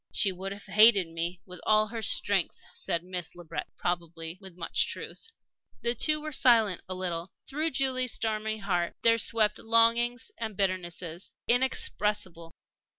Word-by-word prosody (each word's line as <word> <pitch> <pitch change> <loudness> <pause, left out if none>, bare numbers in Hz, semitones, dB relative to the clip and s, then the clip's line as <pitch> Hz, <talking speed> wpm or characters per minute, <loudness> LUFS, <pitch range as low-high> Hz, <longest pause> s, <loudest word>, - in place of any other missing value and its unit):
"She 200 -2 +3
would 190 +1 -6
have 200 0 -9
hated 210 -3 +6
me 170 +2 -4
with 180 -1 -10
all 215 0 +4
her 225 0 -5
strength," 200 -3 +1
said 170 0 -2
Miss 180 -2 -3
Le 175 - -11
Breton, 165 0 -6
probably 170 0 -4
with 190 -3 -13
much 170 - 0
truth. - - -8 0.6
The 235 0 +3
two 305 +6 +2
were 310 0 -6
silent 225 - +4
a 185 - -2
little. 175 -1 -4
Through 305 +4 -1
Julie's 255 -3 0
stormy 220 -1 -2
heart 175 -4 -1
there 230 0 +5
swept 215 -1 +1
longings 230 +2 +2
and 220 -3 -4
bitternesses 180 -3 -2
inexpressible. 210 -8 0
205 Hz, 150 wpm, -28 LUFS, 175-230 Hz, 0.6 s, hated